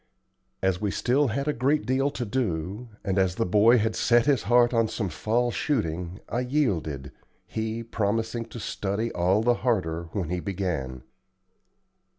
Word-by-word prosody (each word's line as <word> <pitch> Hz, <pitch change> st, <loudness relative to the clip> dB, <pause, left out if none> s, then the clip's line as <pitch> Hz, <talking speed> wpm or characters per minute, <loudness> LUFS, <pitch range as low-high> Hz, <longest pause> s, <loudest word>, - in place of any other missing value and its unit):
As 95 Hz, -1 st, +1 dB
we 105 Hz, -, 0 dB
still 135 Hz, +8 st, +2 dB
had 140 Hz, +5 st, -2 dB
a 150 Hz, -, +2 dB
great 140 Hz, +5 st, +1 dB
deal 135 Hz, +2 st, +1 dB
to 130 Hz, -4 st, -4 dB
do, 105 Hz, -1 st, -2 dB
and 95 Hz, -1 st, 0 dB
as 95 Hz, -2 st, +2 dB
the 115 Hz, -, 0 dB
boy 105 Hz, +6 st, +5 dB
had 110 Hz, 0 st, 0 dB
set 120 Hz, 0 st, +3 dB
his 140 Hz, -5 st, +3 dB
heart 120 Hz, 0 st, +5 dB
on 115 Hz, -1 st, +3 dB
some 105 Hz, -3 st, -3 dB
fall 120 Hz, +6 st, 0 dB
shooting, 90 Hz, -, -2 dB
I 120 Hz, -, -2 dB
yielded, 95 Hz, -, -1 dB, 0.3 s
he 110 Hz, +1 st, -3 dB
promising 115 Hz, +1 st, -1 dB
to 115 Hz, +1 st, -9 dB
study 105 Hz, +2 st, -2 dB
all 95 Hz, +5 st, +2 dB
the 120 Hz, +1 st, +4 dB
harder 85 Hz, -9 st, 0 dB
when 90 Hz, -6 st, -2 dB
he 90 Hz, -, -1 dB
began. 85 Hz, -10 st, -3 dB
110 Hz, 165 wpm, -26 LUFS, 95-120 Hz, 0.3 s, boy